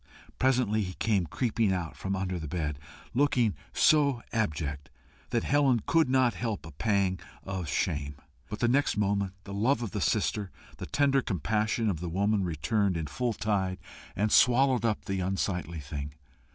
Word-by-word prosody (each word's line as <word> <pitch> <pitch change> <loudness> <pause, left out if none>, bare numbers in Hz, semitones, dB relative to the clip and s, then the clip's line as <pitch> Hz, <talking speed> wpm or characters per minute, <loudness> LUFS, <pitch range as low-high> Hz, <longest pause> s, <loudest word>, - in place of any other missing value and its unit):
Presently 125 -5 +2
he 95 -2 -3
came 100 -4 0
creeping 115 - 0
out 90 -4 -2
from 95 0 -3
under 95 -2 -2
the 80 - -5
bed, 75 -2 -3 0.3
looking 125 -5 +2 0.2
so 140 -6 +3
abject 75 -9 -2 0.4
that 115 - 0
Helen 135 -5 +3
could 165 -5 +3
not 130 -3 +3
help 110 0 -3
a 80 - -9
pang 95 +2 0 0.2
of 95 -3 -4
shame. 75 0 -1 0.3
But 105 - -6
the 120 - +3
next 135 +1 +2
moment 100 -2 0
the 100 - -8
love 120 +5 +1
of 110 - -4
the - - -3
sister, 100 -3 0 0.3
the - - -5
tender 140 -1 +2
compassion 110 - 0
of 95 -7 0
the 85 0 -4
woman, 100 +3 +1
returned 95 +3 0
in 80 - -2
full 115 - -2
tide, 95 -4 -1 0.4
and 105 +2 0
swallowed 125 0 +4
up 110 -2 0
the 95 -1 -2
unsightly 90 -2 -2
thing. 70 0 -6
100 Hz, 165 wpm, -29 LUFS, 90-120 Hz, 0.4 s, swallowed